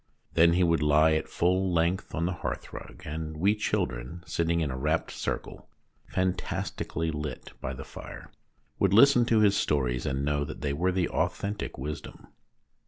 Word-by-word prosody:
Then 85 +1 +5
he 90 +1 +3
would 85 -2 +3
lie 75 +1 +5
at 80 - -1
full 95 +2 +1
length 85 +2 0
on 85 - 0
the 90 - 0
hearthrug, - - -6
and 80 +1 -5
we 100 +6 +3
children, 75 - -2
sitting 85 0 0
in 75 -4 -1
a - - -3
rapt 75 +5 0
circle, - - -5 0.4
fantastically 90 -2 -2
lit 75 0 -5
by 65 - -3
the 70 +1 -8
fire, - - -10 0.5
would 100 0 +3
listen 120 +1 +7
to 115 -2 +3
his 100 -2 +5
stories, 65 -9 0
and 65 +1 -1
know 75 0 +1
that 70 - -7
they 70 -1 -1
were 90 +6 +1
the 90 -2 +1
authentic 100 +1 -2
wisdom. 75 +3 -7
80 Hz, 170 wpm, -28 LUFS, 75-95 Hz, 0.5 s, listen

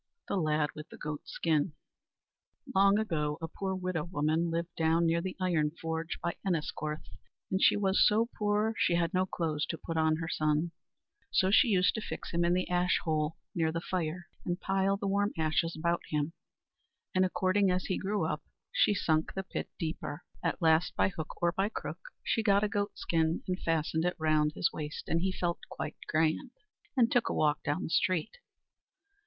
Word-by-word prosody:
The - - -1
Lad 155 -4 +1
with 150 - -9
the - - -11
Goat 150 -1 -5
skin 155 0 +1 1.0
Long 195 +1 +5
ago 150 -8 -1
a 165 - -4
poor 190 +3 -3
widow 185 -4 -2
woman 160 0 0
lived 170 +1 -2
down 165 +1 +3
near 165 +1 +2
the 185 +1 -4
iron 170 -5 +2
forge, 160 0 -3
by 170 - -1
Enniscorth, 155 -4 -2 0.4
and 190 +1 +1
she - - +6
was 195 -1 +3
so 220 +2 +3
poor 210 +1 +1
she 170 - +3
had 170 -1 +1
no 185 0 +2
clothes 155 -4 -1
to 165 - -3
put 165 +1 -4
on 160 0 +3
her 160 0 -4
son; 155 +1 +1 0.6
so 190 0 +3
she 245 - +6
used 185 -4 +3
to 220 - -3
fix - - -6
him 170 0 +1
in 175 +1 +3
the 185 - 0
ash 180 +1 +2
hole, 155 -1 0 0.2
near 160 -2 +1
the 165 - -2
fire, 175 0 -3 0.2
and 175 +1 -2
pile 195 +1 +1
the 200 - -4
warm 205 +1 +1
ashes 160 +1 +1
about 170 +2 +1
him; 150 +1 -1 0.8
and 185 - +4
according 185 +1 +2
as 180 0 0
he 185 - -1
grew 205 +2 0
up, - - -2 0.3
she - - +3
sunk 160 -4 +1
the 195 - -2
pit 190 - -5
deeper. 160 -1 -4 0.2
At - - -1
last, 160 +2 +4
by - - +3
hook 160 -4 -7
or 170 - +4
by 195 +3 0
crook, - - -5 0.2
she 225 - +1
got 200 -2 +4
a - - +3
goat 205 0 -2
skin, 160 0 0
and 185 0 -1
fastened 160 0 0
it 180 - +1
round 155 -1 +2
his - - +1
waist, 150 -1 -6
and 165 - +1
he 190 +1 +1
felt 175 -2 -1
quite - - -5
grand, 160 - +1 0.5
and 235 -2 +4
took 245 - +3
a - - -1
walk 150 -1 +2
down 155 +7 -1
the - - -3
street. 185 - +1
170 Hz, 195 wpm, -31 LUFS, 160-190 Hz, 1.0 s, she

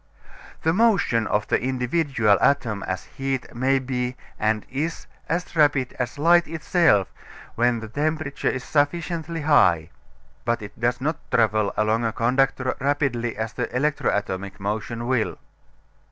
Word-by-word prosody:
The 160 - +3
motion 190 - +2
of 105 0 0
the - - +1
individual 125 -3 +1
atom 115 -8 +2
as 95 -2 -3
heat 135 +8 -4
may 130 +3 +2
be, 125 -1 -2 0.2
and 110 0 0
is, 155 +5 -3 0.2
as 175 +1 -2
rapid 145 -4 +3
as 125 +2 -3
light 170 +3 +4
itself 160 - +2 0.4
when 120 0 +1
the 110 - -6
temperature 145 +3 -1
is 125 - -3
sufficiently 165 +2 -1
high, 85 - +3 0.5
but 115 +2 -1
it 105 +2 -10
does 120 +2 0
not 155 +3 -1
travel 110 -2 +2
along 110 +2 +1
a 115 -1 0
conductor 130 +2 +1
rapidly 135 -5 0
as 110 0 -3
the 125 -2 -3
electro 150 +3 +1
atomic 100 -1 -3
motion 110 +4 -3
will. 125 -3 0
125 Hz, 140 wpm, -24 LUFS, 110-145 Hz, 0.5 s, light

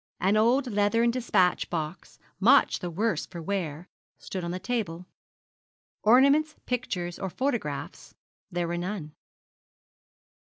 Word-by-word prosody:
An 195 +3 +2
old 240 +5 +3
leathern 210 +3 +2
despatch 230 -7 +1
box, 160 +1 -5 0.2
much 255 +8 +5
the 175 - -4
worse 215 +7 -1
for 175 - -8
wear, 170 -2 -3 0.3
stood 185 -2 -6
on 170 - -3
the 180 - -3
table. 185 -4 -3 1.0
Ornaments, 280 +7 +5
pictures, 180 -8 -3
or 190 - -3
photographs 235 - -3 0.4
there 175 -1 -1
were 170 +1 -2
none. 180 -4 -4
195 Hz, 120 wpm, -27 LUFS, 175-235 Hz, 1.0 s, much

